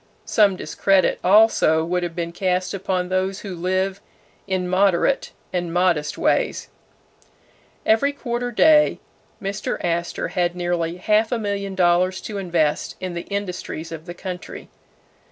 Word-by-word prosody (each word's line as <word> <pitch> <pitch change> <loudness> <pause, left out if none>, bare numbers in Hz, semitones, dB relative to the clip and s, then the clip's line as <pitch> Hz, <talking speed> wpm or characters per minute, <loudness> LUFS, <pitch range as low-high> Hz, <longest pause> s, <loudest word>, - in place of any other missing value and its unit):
Some 205 -3 +3
discredit 195 +1 +1
also 185 -5 +4
would 180 +1 -1
have 175 -1 -4
been 170 -1 -3
cast 185 +1 -1
upon 185 -2 -2
those 190 +1 -1
who 195 -3 -6
live 185 +2 -1 0.5
in 185 -2 -1
moderate 190 +7 +2 0.2
and 175 -2 -2
modest 175 -4 +1
ways. - - 0 1.2
Every 225 +6 +3
quarter 245 -3 -3
day 300 +5 +4 0.4
Mr. 195 +1 -3
Astor 170 0 -2
had 175 -1 0
nearly 175 -1 -1
half 215 +4 +2
a 245 - +1
million 200 -2 -3
dollars 185 +1 +2
to 205 -2 -5
invest 170 -5 0
in 185 -1 -4
the 170 0 -6
industries 185 -5 -4
of 165 +1 -8
the 175 - -7
country. 180 -1 -7
185 Hz, 135 wpm, -22 LUFS, 175-200 Hz, 1.2 s, also